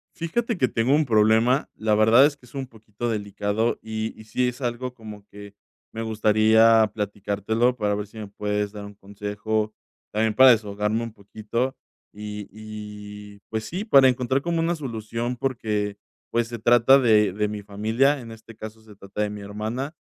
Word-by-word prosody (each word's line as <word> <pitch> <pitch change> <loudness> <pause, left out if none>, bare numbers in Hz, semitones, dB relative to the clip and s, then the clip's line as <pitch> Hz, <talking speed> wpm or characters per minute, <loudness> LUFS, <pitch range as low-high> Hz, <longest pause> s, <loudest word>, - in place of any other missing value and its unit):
Fíjate 220 +6 -2
que 130 - +2
tengo 120 +5 +1
un 155 0 +2
problema, 110 +4 +3
la 110 -1 0
verdad 110 +5 +6
es 145 -1 -2
que 130 - -24
es 120 - -19
un 135 -1 -4
poquito 110 -1 -7
delicado 105 +1 -1
y 110 0 -4
y - - -11
sí 125 +3 0
es 125 +2 -4
algo 125 0 -3
como 105 -3 -11
que 100 0 -12 0.4
me 115 - -5
gustaría 110 0 +4
platicártelo 105 +4 -1
para 105 -2 0
ver 105 0 -4
si 110 +2 -14
me 105 - -6
puedes 105 0 -2
dar 105 -1 -8
un 100 0 -10
consejo, 105 +2 -3 0.4
también 110 0 +1
para 130 +2 +8
desahogarme 105 0 +1
un 115 -1 -6
poquito, 110 +5 -4 0.4
y 105 0 -7
y, 105 -1 -10
pues, 110 0 -3
sí, 185 - -5
para 135 - +7
encontrar 130 +2 0
como 170 -1 -1
una 170 +1 +1
solución 115 -3 -4
porque, 105 -6 -2 0.3
pues, 115 0 +1
se 120 0 -6
trata 120 +4 +5
de 105 -6 +4
de 105 +2 -1
mi 105 0 -6
familia, 110 +8 +1
en 115 -2 -10
este 115 0 -13
caso, 110 0 -10
se 110 -1 -15
trata 100 +1 -5
de 105 - -1
mi 105 0 -7
hermana. 110 +8 -5
110 Hz, 180 wpm, -24 LUFS, 105-120 Hz, 0.4 s, para